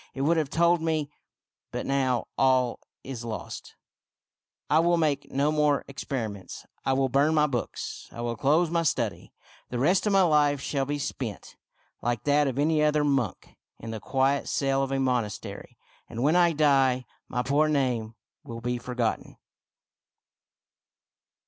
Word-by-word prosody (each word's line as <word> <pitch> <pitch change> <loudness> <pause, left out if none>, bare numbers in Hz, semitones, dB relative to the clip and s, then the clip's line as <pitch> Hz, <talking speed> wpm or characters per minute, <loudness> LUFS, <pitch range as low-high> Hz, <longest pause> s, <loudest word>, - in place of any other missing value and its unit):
It 135 - -3
would 165 +4 +3
have 155 -3 0
told 170 +2 +3
me 155 -3 -1 0.3
— - - -65
But - - -4
now, 130 -3 +1
all 130 -2 +2 0.2
is 130 -3 -6
lost, 115 -2 -7 0.9
I 155 - +4
will 170 +1 +3
make 150 -4 0
no 140 +3 +1
more 150 -2 +2
experiments; 115 -8 -5 0.2
I 135 - +1
will 135 0 +2
burn 140 +5 +2
my 150 -1 +4
books; 125 -5 -4
I 115 - -7
will 120 0 -2
close 155 +8 +2
my 170 -1 +2
study. 110 - -1 0.4
The 125 - -3
rest 175 - +2
of 205 - +2
my 195 -1 +5
life 150 -4 +3
shall 135 0 -1
be 145 +2 -2
spent, 125 -7 -5 0.5
like 120 -2 -1
that 145 0 +3
of 130 -1 -3
any 155 +2 +2
other 150 0 +3
monk, 135 -9 -1 0.2
in 115 - -7
the 110 - -5
quiet 135 +5 0
cell 135 -1 +1
of 135 0 -2
a 135 - 0
monastery; 125 -5 -3 0.3
and 120 +1 -4
when 150 +4 +3
I 175 -1 +4
die 135 -4 +3 0.2
my 125 0 -2
poor 145 +3 +2
name 125 -6 0 0.3
will 115 -5 -7
be 120 +1 -2
forgotten." 120 -2 -3
135 Hz, 160 wpm, -27 LUFS, 125-150 Hz, 0.9 s, my